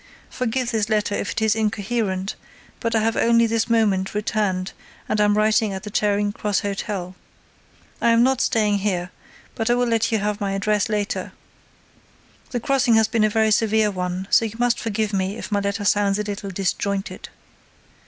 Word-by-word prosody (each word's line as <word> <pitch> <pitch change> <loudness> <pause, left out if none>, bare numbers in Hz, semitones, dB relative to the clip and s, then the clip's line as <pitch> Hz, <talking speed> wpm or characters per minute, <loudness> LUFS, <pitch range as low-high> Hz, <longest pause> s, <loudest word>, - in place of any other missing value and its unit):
Forgive 250 0 -1
this 220 -2 0
letter 210 -1 +1
if 205 - -2
it - - -2
is 220 0 +3
incoherent 210 -2 -1 0.5
but 230 0 -1
I 220 - +3
have 225 +1 +1
only 230 0 +4
this 230 +1 0
moment 205 -4 +1
returned 205 -3 -1 0.4
and 215 - +1
am 205 0 +3
writing 215 0 +2
at 190 - -6
the 210 - -7
Charing 205 0 +1
Cross 205 -1 -1
Hotel. 195 -2 -4 0.9
I 235 - +3
am 230 0 +5
not 265 0 +2
staying 210 -2 +2
here, 185 -3 -2 0.4
but 225 0 -2
I 240 - +4
will 245 0 +1
let 230 -1 +1
you 220 - +2
have 210 0 -2
my 195 -1 -1
address 205 +2 0
later. 210 -1 -2 1.2
The 245 - -2
crossing 265 -1 +2
has 220 -1 +4
been 225 -1 +1
a 215 - +4
very 220 0 +2
severe 220 -1 +2
one 180 0 -3
so - - +5
you 225 -1 -4
must 245 0 +1
forgive 215 -1 -2
me 195 +2 -1
if - - -7
my 205 - +2
letter 200 +1 -2
sounds 200 -1 +2
a 210 - -1
little 205 -1 -5
disjointed. 195 +1 -3
210 Hz, 185 wpm, -22 LUFS, 200-225 Hz, 1.2 s, am